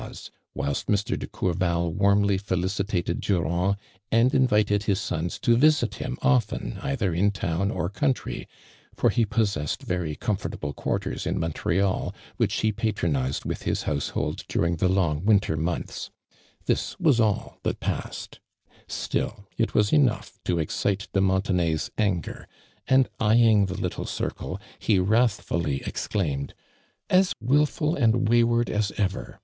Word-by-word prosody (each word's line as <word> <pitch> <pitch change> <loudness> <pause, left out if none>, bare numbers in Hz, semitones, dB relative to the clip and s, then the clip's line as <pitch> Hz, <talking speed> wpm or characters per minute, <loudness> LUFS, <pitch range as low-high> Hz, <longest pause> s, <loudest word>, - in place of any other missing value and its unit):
e, - - -6 0.5
whilst 70 0 -2
Mr. 105 -1 +1
<le - - -2
T'ourval 85 -2 -1
wuiinly 100 0 +3
i'elicitatud 95 0 -1
Duranrl, 90 +1 +1 0.4
and 115 +3 +4
invitod 105 -7 +3
his 100 -2 +1
sons 90 -3 -3
to 120 - +3
visit 145 -2 +4
him 130 0 -3
ofton 125 -4 +1
either 125 -10 0
in 95 +5 +3
town 95 -1 -1
or 85 - -1
country, 130 +7 -2 0.5
for - - +3
he 115 -2 +2
pos 105 0 +1
sessed 75 -6 -3
very 90 -4 -2
conifortuble 75 -7 -3
(|uarters - - -2
in - - -1
Mon 80 0 -1
treal, 95 +4 0 0.2
which - - +1
he 110 -1 +2
j)atronized 85 - -1
with - - -3
his - - -1
houso 70 -1 -2
liold - - -2
during 85 0 0
the 90 +2 +2
long 85 -5 +1
winter 100 -6 +3
months; 80 +2 -3 0.6
tiiis - - -1
was 140 -7 +4
all 110 -3 0
that - - -2
passed. - - -4 0.5
Still 105 -2 -3
it 115 - -1
was 105 -1 +3
enough 140 -7 +2
to 90 - +1
excite 100 +5 -1
de 95 - +2
Muntenay's 95 -4 +1
nngei'. 95 -6 -1 0.4
and 130 -1 +5
eyeing 110 -2 +5
tlie 95 +1 -5
little 90 -3 -3
circle, - - -4 0.2
he 105 - +2
wrathliilly 95 - +1
exclaimed: 70 -9 -2 0.6
•• - - +4
As 185 0 +4
wilful 150 +6 +2
and 120 -2 +2
wayward 120 +1 +3
as 105 -1 0
ever! 95 -3 -2
100 Hz, 145 wpm, -26 LUFS, 85-115 Hz, 0.6 s, and